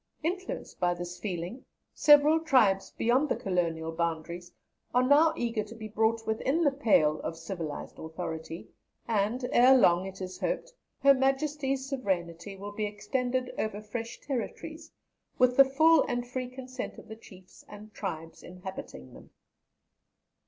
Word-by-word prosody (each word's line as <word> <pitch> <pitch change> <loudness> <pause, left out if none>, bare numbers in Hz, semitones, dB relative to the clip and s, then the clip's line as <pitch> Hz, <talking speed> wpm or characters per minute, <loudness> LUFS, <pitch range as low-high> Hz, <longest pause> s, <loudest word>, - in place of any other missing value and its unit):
Influenced 375 +8 -4
by 175 0 +2
this 175 0 -7
feeling, 185 +7 -5 0.3
several 295 +2 +6
tribes 245 -12 +3
beyond 255 +6 +1
the - - +1
colonial 165 -4 -1
boundaries 170 +1 -3 0.4
are 250 - +5
now 295 +5 +5
eager 230 -2 -1
to 215 +2 -11
be 220 -1 -7
brought 225 +1 0
within 270 +9 0
the 290 - +4
pale 200 - +3
of 165 - -5
civilized 165 -3 -6
authority, 160 0 -6 0.4
and 230 +4 0
ere 255 +2 +7
long, 180 -5 +4
it 190 0 -9
is 185 -1 -6
hoped, - - -2 0.3
Her 275 0 +8
Majesty's 270 0 0
sovereignty 190 - -3
will 200 +1 -7
be 210 0 -2
extended 250 +5 -2
over 215 -1 -2
fresh 225 +2 -6
territories, 310 +5 -5 0.5
with 250 0 +4
the 275 - +8
full 315 +4 +5
and 245 -2 -2
free 255 +1 -4
consent 255 0 -7
of - - -12
the 220 - -8
chiefs 190 -4 -16
and 210 +1 -12
tribes 165 -5 -6
inhabiting 180 - -9
them." - - -14
220 Hz, 145 wpm, -29 LUFS, 180-265 Hz, 0.5 s, Her